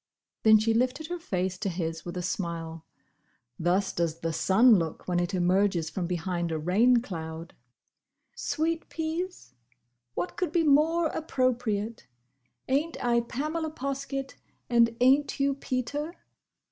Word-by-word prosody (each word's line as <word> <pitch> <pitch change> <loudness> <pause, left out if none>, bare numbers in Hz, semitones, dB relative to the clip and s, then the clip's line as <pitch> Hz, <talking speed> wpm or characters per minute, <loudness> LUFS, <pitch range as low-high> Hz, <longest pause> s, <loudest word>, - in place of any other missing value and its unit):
Then 220 -1 +7
she 220 +1 +2
lifted 255 +7 0
her 355 0 -3
face 185 - -2
to 205 - -1
his 165 -2 -3
with 175 +1 -5
a 180 - -3
smile. 165 -3 -4 0.7
Thus 185 +4 +1
does 165 -1 -1
the 165 0 -1
sun 210 +7 +5
look 165 -2 -4
when 175 -1 +1
it 175 +2 -1
emerges 180 -2 +2
from 180 -3 -2
behind 175 -1 -2
a 160 - -1
rain 225 +10 +3
cloud. 165 -4 -6 0.8
"Sweet 330 +1 -2
peas? 325 - -4 0.6
What 175 - -3
could 365 - -1
be 340 -2 +2
more 315 +3 +4
appropriate? 240 - -1 0.6
Ain't 295 +5 0
I 235 0 +4
Pamela 305 +7 -3
Poskett? 275 -1 -4 0.3
and 230 -1 +4
ain't 270 +4 +3
you 275 0 +2
Peter?" 280 +5 -3
225 Hz, 135 wpm, -28 LUFS, 175-275 Hz, 0.8 s, Then